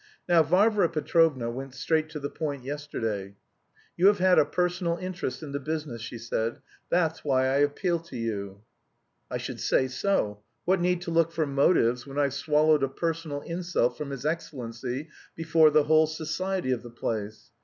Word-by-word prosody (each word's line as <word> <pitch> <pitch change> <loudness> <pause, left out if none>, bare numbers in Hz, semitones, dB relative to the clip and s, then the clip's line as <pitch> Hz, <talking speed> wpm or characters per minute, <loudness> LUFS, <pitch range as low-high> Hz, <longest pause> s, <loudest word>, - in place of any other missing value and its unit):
Now, 175 -2 +6
Varvara 190 +4 +3
Petrovna 155 -6 +2
went 135 +2 -7
straight 155 -1 0
to 155 - -6
the 140 - -3
point 145 -5 -4
yesterday. 115 -9 -4 0.6
'You 185 - +4
have 205 0 +5
had 185 0 +5
a - - +5
personal 180 -1 0
interest 175 -7 -4
in 145 - -7
the 140 - -2
business,' 150 -5 -4
she 120 +1 -6
said, 115 0 -2 0.3
'that's 165 -2 +1
why 130 -3 +2
I 135 +1 +2
appeal 145 +5 +1
to 165 -6 -10
you.' 100 -3 -4 0.7
I - - -2
should - - -6
say 130 - +2
so! 130 - -1 0.2
What 185 0 +2
need 180 0 +1
to 170 - -4
look 165 0 +3
for 165 -2 0
motives 135 -3 +2
when 135 +1 -8
I've 140 -2 +2
swallowed 150 +1 +3
a 135 - +1
personal 160 -1 -3
insult 170 -8 -1
from 150 0 -5
his 135 0 -6
excellency 135 -3 -4 0.3
before 160 -1 +4
the 150 0 +4
whole 155 +1 +4
society 165 +1 -2
of 125 -2 0
the 120 - -10
place. 110 -2 -5
150 Hz, 175 wpm, -27 LUFS, 130-165 Hz, 0.7 s, Now